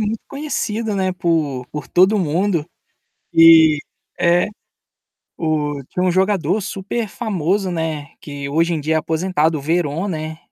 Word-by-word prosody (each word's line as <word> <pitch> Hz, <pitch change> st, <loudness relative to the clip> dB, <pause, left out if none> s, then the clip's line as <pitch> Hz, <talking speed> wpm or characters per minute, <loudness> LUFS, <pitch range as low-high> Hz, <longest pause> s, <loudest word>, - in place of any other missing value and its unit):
muito 215 Hz, +1 st, -2 dB
conhecido, 235 Hz, -7 st, -3 dB
né, 190 Hz, -1 st, 0 dB
por 155 Hz, -8 st, -1 dB
por 150 Hz, -, -6 dB
todo 190 Hz, +4 st, +4 dB
mundo. 170 Hz, -1 st, 0 dB, 0.7 s
E 165 Hz, -2 st, +7 dB, 0.4 s
é. 175 Hz, +1 st, +3 dB, 1.0 s
O 150 Hz, -3 st, -1 dB
tinha 180 Hz, -, -1 dB
um 180 Hz, -, +2 dB
jogador 190 Hz, 0 st, +1 dB
super 200 Hz, +4 st, -4 dB
famoso, 195 Hz, -3 st, -1 dB
né, 160 Hz, -4 st, -3 dB
que 145 Hz, -1 st, -7 dB
hoje 165 Hz, +4 st, +1 dB
em -, -, -2 dB
dia 155 Hz, +2 st, -1 dB
é -, -, +4 dB
aposentado, 160 Hz, 0 st, 0 dB
o -, -, -6 dB
Veron, 165 Hz, +3 st, -1 dB
né, 155 Hz, -3 st, -4 dB
170 Hz, 145 wpm, -19 LUFS, 155-190 Hz, 1.0 s, E